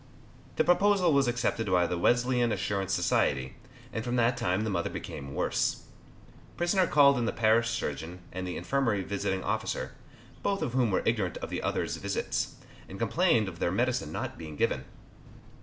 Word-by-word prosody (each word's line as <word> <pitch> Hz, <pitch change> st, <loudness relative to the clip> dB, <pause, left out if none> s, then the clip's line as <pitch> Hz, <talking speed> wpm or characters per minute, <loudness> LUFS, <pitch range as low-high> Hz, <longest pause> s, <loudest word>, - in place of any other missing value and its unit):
The -, -, +3 dB
proposal 185 Hz, -1 st, +4 dB
was 140 Hz, -2 st, +3 dB
accepted 120 Hz, -2 st, 0 dB
by 90 Hz, -2 st, +3 dB
the 90 Hz, -, -1 dB
Wesleyan 120 Hz, +5 st, +2 dB
Assurance 100 Hz, -2 st, -1 dB
Society, 70 Hz, -8 st, +1 dB, 0.4 s
and 110 Hz, -, -2 dB
from 120 Hz, +1 st, -2 dB
that 120 Hz, 0 st, +3 dB
time 105 Hz, -5 st, 0 dB
the 110 Hz, -, -1 dB
mother 85 Hz, -3 st, -1 dB
became 70 Hz, -1 st, -7 dB
worse. -, -, 0 dB, 0.7 s
Prisoner 180 Hz, +1 st, +2 dB
called 140 Hz, -4 st, +5 dB
in 120 Hz, -, 0 dB
the -, -, 0 dB
parish 115 Hz, +1 st, +3 dB
surgeon 80 Hz, -3 st, -4 dB
and 95 Hz, 0 st, -4 dB
the 90 Hz, -, -4 dB
infirmary 110 Hz, 0 st, 0 dB
visiting 95 Hz, -1 st, -2 dB
officer, -, -, -2 dB, 0.5 s
both 200 Hz, 0 st, 0 dB
of 120 Hz, -, -3 dB
whom 125 Hz, -3 st, +2 dB
were 95 Hz, -, +1 dB
ignorant 105 Hz, -6 st, 0 dB
of -, -, -6 dB
the -, -, -2 dB
other's -, -, -1 dB
visits, -, -, -2 dB, 0.3 s
and 95 Hz, -, -8 dB
complained 115 Hz, -, +2 dB
of 85 Hz, -2 st, -7 dB
their 85 Hz, -, +1 dB
medicine 120 Hz, -4 st, 0 dB
not -, -, -5 dB
being 80 Hz, -2 st, -7 dB
given. -, -, 0 dB
115 Hz, 175 wpm, -29 LUFS, 90-130 Hz, 0.7 s, called